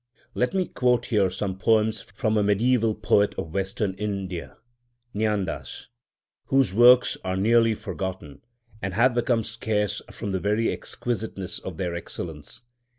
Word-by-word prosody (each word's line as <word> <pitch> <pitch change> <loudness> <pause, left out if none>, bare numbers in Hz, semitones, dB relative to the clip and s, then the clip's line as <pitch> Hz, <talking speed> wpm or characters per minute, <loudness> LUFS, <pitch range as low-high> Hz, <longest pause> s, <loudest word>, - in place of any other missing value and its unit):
Let 125 +9 0
me 185 -1 +2
quote 125 -1 +1
here 100 -5 +2
some 95 +1 -4
poems 110 +2 +2
from 110 +2 -2
a 105 - +3
mediæval 110 +2 +2
poet 100 0 +3
of 80 - -5
Western 95 +1 -1
India—Jnândâs—whose 110 +3 -4
works 125 +3 +6
are 95 0 -2
nearly 115 +2 +4
forgotten, 95 -9 -6 0.4
and 95 -2 -3
have 125 +3 +4
become 120 -1 +1
scarce 105 -2 -1
from 105 -3 -5
the 95 - -1
very 105 +5 +1
exquisiteness 110 -5 -4
of 90 -4 -7
their 90 -1 -2
excellence. 80 - -6
105 Hz, 130 wpm, -25 LUFS, 95-120 Hz, 0.4 s, works